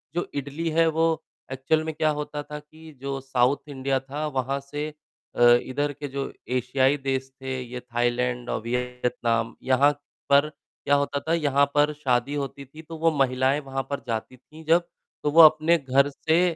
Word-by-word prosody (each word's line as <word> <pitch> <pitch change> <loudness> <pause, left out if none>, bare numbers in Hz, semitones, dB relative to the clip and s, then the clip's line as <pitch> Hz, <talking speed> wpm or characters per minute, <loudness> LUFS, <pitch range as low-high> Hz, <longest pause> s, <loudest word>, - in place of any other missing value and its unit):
जो 175 - -1
इडली 145 +4 -3
है, 165 +1 +3
वो 160 0 +1 0.3
ऐक्चुअल 135 +4 0
में 160 0 -4
क्या 155 0 +2
होता 150 0 -4
था 150 +1 -7
कि 155 +2 -15
जो 135 0 -3
साउथ 130 +1 +1
इंडिया 135 -1 -1
था, 140 +3 -5
वहाँ 135 -1 -2
से 145 +2 -5 0.4
अ, - - -2 0.2
इधर 145 +3 -2
के 145 +1 -6
जो 140 0 -4 0.3
एशियाई 130 +2 +2
देश 135 -1 -2
थे, 130 -1 -3
ये 125 0 -7
थायलैंड 120 0 -1
और - - -2
वियतनाम, 120 -1 -1
यहाँ 135 +3 +4 0.4
पर 140 +1 +5
क्या 145 -1 -3
होता 140 0 0
था, 160 +3 -2
यहाँ 140 -4 +3
पर 150 +1 +3
शादी 135 -2 0
होती 140 -1 -5
थी, 155 +4 -13
तो 165 0 -9
वो 165 +1 +3
महिलायें 130 +1 +2
वहाँ 135 0 -3
पर 140 - -2
जाती 115 +2 -4
थीं 155 +5 -15
जब, 170 +2 +3 0.4
तो 150 - +1
वो 165 +3 +8
अपने 155 +2 +6
घर 140 -1 +2
से 160 +4 +1
140 Hz, 180 wpm, -25 LUFS, 130-150 Hz, 0.4 s, वो